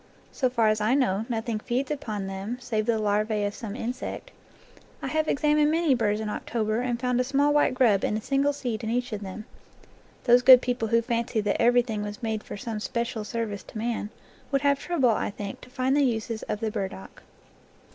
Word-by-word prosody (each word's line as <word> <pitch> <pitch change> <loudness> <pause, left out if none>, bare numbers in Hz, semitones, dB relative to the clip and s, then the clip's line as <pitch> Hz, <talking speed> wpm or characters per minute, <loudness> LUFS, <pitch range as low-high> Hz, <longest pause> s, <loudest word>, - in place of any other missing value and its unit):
So 255 - 0
far 230 -3 +2
as 215 0 +1
I 220 +5 +3
know, 225 -5 +1
nothing 225 -1 -2
feeds 255 +5 -2
upon 215 -9 -3
them, 195 +5 -4
save 220 -3 -2
the 230 -1 +2
larvae 210 0 0
of 205 0 -1
some 210 -2 -6
insect. 250 - -5 0.7
I - - -6
have 310 0 0
examined 300 +1 +3
many 320 -2 +3
burrs 215 -4 +1
in 220 - -3
October 215 +1 -2
and 245 -1 -1
found 250 0 0
a - - +3
small 280 +3 +2
white 290 -3 +3
grub 225 -7 +3
in 210 - 0
a - - -4
single 275 +4 +1
seed 245 -5 -4
in 220 - -2
each 245 0 -1
of 210 - -4
them. 200 +2 -7 0.8
Those 245 0 +6
good 255 0 +9
people 245 -2 -1
who 230 +1 +2
fancy 235 -1 -1
that 205 - 0
everything 235 -2 +3
was 210 +3 -6
made 220 -1 -1
'for - - -7
some 225 -1 -4
special 235 0 -3
service 210 -2 -3
to - - -11
man, 225 -1 -2 0.4
would 275 -1 +2
have 280 -1 +2
trouble, 290 -6 +1
I 215 - -1
think, 200 -1 -7
to - - -13
find 260 +1 0
the 290 - +4
uses 225 -3 -1
of 210 - -2
the 220 -1 -1
burdock. 190 - -6
230 Hz, 210 wpm, -26 LUFS, 215-255 Hz, 0.8 s, good